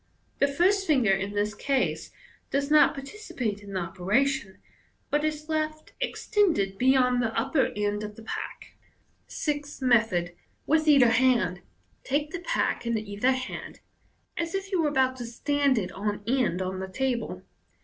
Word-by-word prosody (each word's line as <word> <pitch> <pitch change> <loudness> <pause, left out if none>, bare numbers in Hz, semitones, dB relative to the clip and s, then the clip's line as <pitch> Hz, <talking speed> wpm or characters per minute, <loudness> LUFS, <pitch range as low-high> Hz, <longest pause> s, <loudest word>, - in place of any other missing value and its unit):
The 280 - +4
first 375 +7 +2
finger 260 -10 +3
in 195 +1 0
this 205 +1 0
case 270 +3 -1 0.4
does 280 +1 -1
not 305 - +6
participate 275 - -5
in 200 -1 -10
the 185 - -1
operation, 200 +6 0 0.5
but 295 +1 +2
is 305 0 -2
left 310 -1 -2
extended 345 - +1
beyond 255 -1 +4
the 225 -2 0
upper 270 +4 +2
end 205 0 -1
of 210 0 -7
th«* 225 - -12
pack. - - -6 0.5
Sixth 290 -1 -3
Method. 220 -9 +2 0.3
(With 315 0 +2
either 275 -5 +7
hand.) 225 -7 +2 0.2
— - - -40
Take 295 +2 +1
the 350 - -4
pack - - -1
in 235 -1 +1
either 215 +4 0
hand, 255 0 -6 0.6
as 335 +2 -3
if 390 +1 -4
you 370 -3 +2
were 305 - +2
about 260 -2 +1
to 245 - -5
stand 280 +2 +1
it 185 -4 -2
on 205 +1 -3
end 230 -7 +1
on 185 0 -4
the 190 - -4
table, 245 +3 -1
the - - -10
Fig. - - -32
260 Hz, 170 wpm, -27 LUFS, 205-295 Hz, 0.6 s, either